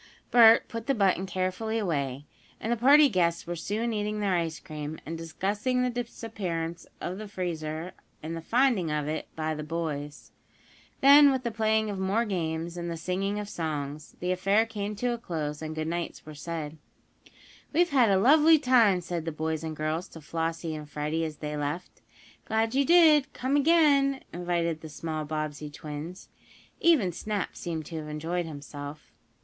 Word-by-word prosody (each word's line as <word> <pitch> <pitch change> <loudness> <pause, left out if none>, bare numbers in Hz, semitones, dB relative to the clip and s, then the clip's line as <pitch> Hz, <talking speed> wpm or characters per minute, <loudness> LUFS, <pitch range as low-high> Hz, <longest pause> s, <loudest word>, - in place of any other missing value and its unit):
Bert 230 -1 +7
put 230 0 -6
the 275 - +2
button 195 -3 +2
carefully 185 +5 -2
away, 145 - -2 0.3
and 225 - -3
the - - +3
party 285 +6 +7
guests 175 -7 +1
were 175 - -4
soon 215 +7 -2
eating 210 0 -2
their 200 -2 +1
ice 165 -2 -1
cream, 155 -2 -6
and 165 - -4
discussing 205 +10 -1
the 250 - 0
disappearance 190 -8 -4
of 185 +3 -4
the 215 - -6
freezer 170 -3 -4 0.3
and 160 +2 -4
the 165 - -5
finding 230 -3 +2
of 150 -1 -1
it 155 +1 -3
by 155 0 -1
the 150 - -5
boys. 150 -2 -5 0.7
Then 280 +1 +8
with 260 -1 -1
the 235 - -2
playing 220 -1 +1
of 195 - -5
more 200 +5 +1
games, 170 -3 -3
and 170 0 -4
the 165 - -4
singing 190 +5 -2
of 210 -1 -4
songs, 150 -5 -4
the 180 +1 0
affair 195 +4 +3
came 210 -2 -4
to 245 +4 -1
a 235 - -5
close, 155 -8 -4
and 155 0 -5
goodnights 165 +2 -3
were 155 - -9
said. 155 0 -6 0.9
"We've 345 +2 +2
had 250 -5 +5
a 195 - +4
lovely 305 +9 +6
time!" 235 -9 +4
said 170 -1 -4
the 165 - -2
boys 160 +1 -3
and 160 -1 -4
girls 155 +3 -2
to 160 - -11
Flossie 165 +1 -3
and 150 -1 -7
Freddie, 150 +2 -2
as 155 -1 -6
they 150 -1 -4
left. 150 +5 -4 0.4
"Glad 225 +1 0
you 275 +1 +3
did 310 -4 +6
come 260 +3 -1
again," 285 -3 +4
invited 170 -2 -1
the 160 - -8
small 155 0 -4
Bobbsey 155 -1 -4
twins. 150 +4 -8 0.5
Even 290 - +4
Snap 205 +3 -3
seemed 160 -3 -4
to 165 - -6
have 155 -1 -6
enjoyed 165 +3 -3
himself. 145 0 -8
175 Hz, 175 wpm, -28 LUFS, 155-225 Hz, 0.9 s, Then